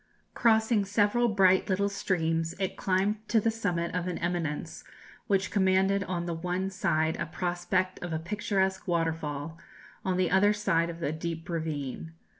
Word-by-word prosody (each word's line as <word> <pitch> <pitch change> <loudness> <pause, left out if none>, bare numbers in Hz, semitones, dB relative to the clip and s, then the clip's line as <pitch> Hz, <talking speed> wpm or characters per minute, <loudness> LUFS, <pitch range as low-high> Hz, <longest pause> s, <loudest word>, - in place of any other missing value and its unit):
Crossing 220 -2 +3
several 205 +4 +2
bright 190 -3 +4
little 200 +1 +2
streams, 165 -4 -1
it 190 -1 -2
climbed 195 +3 +1
to 225 - +4
the 225 +1 +1
summit 180 -7 -2
of 180 0 -2
an 180 - -2
eminence 170 -4 -3 0.4
which 195 -3 +1
commanded 190 0 +3
on 175 -2 -3
the 170 - -2
one 180 +3 -2
side 160 -5 +1
a 170 - -3
prospect 180 +2 -1
of 175 - -5
a 160 - 0
picturesque 190 +2 -1
waterfall, 165 -2 -2 0.4
on 185 -1 0
the 185 -1 +1
other 205 +3 +5
side 170 -5 +1
of 170 0 -7
a 145 - 0
deep 165 +1 -5
ravine. 160 -2 -4
180 Hz, 160 wpm, -29 LUFS, 165-200 Hz, 0.4 s, other